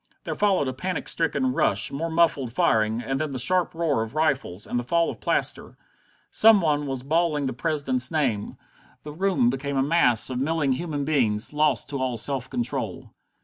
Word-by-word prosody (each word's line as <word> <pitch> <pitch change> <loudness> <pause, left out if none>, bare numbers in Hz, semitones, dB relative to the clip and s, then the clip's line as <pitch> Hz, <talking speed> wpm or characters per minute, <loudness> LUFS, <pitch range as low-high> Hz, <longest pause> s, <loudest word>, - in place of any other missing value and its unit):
There - - -3
followed 195 -9 +1
a 130 - -2
panic 180 +8 -4
stricken 140 -6 0
rush, 100 -4 +2
more 160 +4 -3
muffled 160 -7 +1
firing, 110 0 +1
and 135 +1 -2
then 155 - -2
the 135 - -5
sharp 180 +7 +1
roar 160 -8 0
of 115 +5 -6
rifles, 140 - -1
and 120 - -2
the - - -4
fall 170 +7 +1
of - - -12
plaster. - - -2 0.5
Some 220 -1 +6
one 150 -4 0
was 135 -2 -4
bawling 155 0 0
the 130 - -2
President's 130 -3 -1
name. 130 -10 -1 0.5
The 150 - -8
rooms 180 -8 +1
became 135 +1 -3
a 135 - +2
mass 135 -6 +2
of 125 0 -2
milling 150 -1 0
human 145 +1 -2
beings, 120 -7 +1
lost 150 0 +1
to 140 - -3
all 130 -2 -2
self 130 +2 -1
control. 120 0 -4
140 Hz, 190 wpm, -24 LUFS, 125-160 Hz, 0.5 s, Some